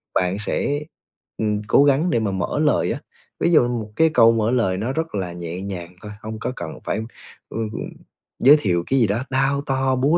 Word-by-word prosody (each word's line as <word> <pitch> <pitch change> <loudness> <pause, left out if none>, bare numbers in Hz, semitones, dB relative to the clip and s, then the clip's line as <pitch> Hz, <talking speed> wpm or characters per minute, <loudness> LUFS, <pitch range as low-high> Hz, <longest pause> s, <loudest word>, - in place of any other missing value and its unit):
bạn 90 +2 +1
sẽ, 140 +7 -1 0.6
ừm, 105 -1 0
cố 140 - +5
gắng 145 +5 +3
để 120 - +2
mà 110 -3 -1
mở 95 -2 -2
lời - - +2
á. - - -4 0.4
Ví 170 - +2
dụ 140 -7 +5
một 115 -3 -4
cái 160 +4 +4
câu 115 -6 +6
mở 115 0 +1
lời 115 -7 +1
nó 110 +6 -2
rất 160 -1 -3
là 90 -3 -3
nhẹ 85 +1 -6
nhàng 90 -3 -6
thôi, 105 - -8
hông 110 0 -6
có 125 +3 -3
cần 80 -2 -7
phải, - - -2 0.5
ừm, 115 -1 -3
ừm, - - -5 0.5
giới 145 +4 +7
thiệu 85 -6 +1
cái 135 - +2
gì 115 - +4
đó 105 +5 -1
đao 135 +1 +1
to, 135 -1 0
búa 140 +6 +3
115 Hz, 220 wpm, -22 LUFS, 100-135 Hz, 0.6 s, giới